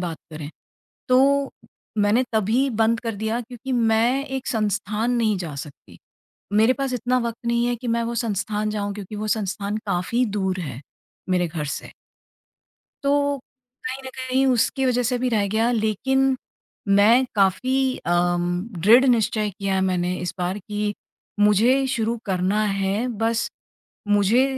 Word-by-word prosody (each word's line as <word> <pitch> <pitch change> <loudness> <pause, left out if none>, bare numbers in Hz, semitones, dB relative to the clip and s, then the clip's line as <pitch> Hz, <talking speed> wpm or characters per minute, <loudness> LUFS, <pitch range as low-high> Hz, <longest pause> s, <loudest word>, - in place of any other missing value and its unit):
बात 170 -3 -3 0.2
करें। 155 -1 -7 0.6
तो 275 +2 +4 0.5
मैंने 205 +5 +3
तभी 225 +6 +2
बंद 225 0 +1
कर 230 -2 -3
दिया 220 +3 -1
क्योंकि 245 +2 -7
मैं 235 +3 +2
एक 265 -1 -5
संस्थान 215 +1 -1
नहीं 220 -4 +2
जा 165 -5 -5
सकती। 145 0 -10 0.5
मेरे 220 +4 +5
पास 270 -2 -2
इतना 250 +1 +1
वक़्त 235 0 -4
नहीं 235 0 +2
है 245 - +1
कि 240 +1 -6
मैं 235 0 +1
वो 235 - -3
संस्थान 215 -1 -1
जाऊँ 205 -1 -3
क्योंकि 205 +1 -7
वो 215 - -3
संस्थान 200 0 -3
काफ़ी 200 +7 0
दूर 190 -1 -1
है 135 -6 -6 0.5
मेरे 180 -2 +1
घर 155 -2 -4
से। 140 - -5 1.1
तो 285 0 +2 0.5
कहीं 260 +1 -4
न - - -5
कहीं 260 +1 +1
उसकी 260 +2 +2
वजह 250 -1 +2
से 245 +1 0
भी 255 0 0
रह 210 -3 +1
गया 225 +4 +1
लेकिन 260 +5 +1 0.6
मैं 230 +6 +5
काफ़ी 255 +7 +2
अम 175 0 +2 0.3
दृढ़ 235 +7 +7
निश्चय 220 -4 +2
किया 195 0 -3
है 190 - +1
मैंने 180 -1 0
इस 180 0 -3
बार 180 +3 -1
कि 210 +1 -3 0.5
मुझे 225 +6 +4
शुरू 235 -2 -1
करना 190 +2 +1
है। 195 +3 0
बस 225 +1 0 0.6
मुझे 205 +5 +4
220 Hz, 155 wpm, -23 LUFS, 200-250 Hz, 1.1 s, दृढ़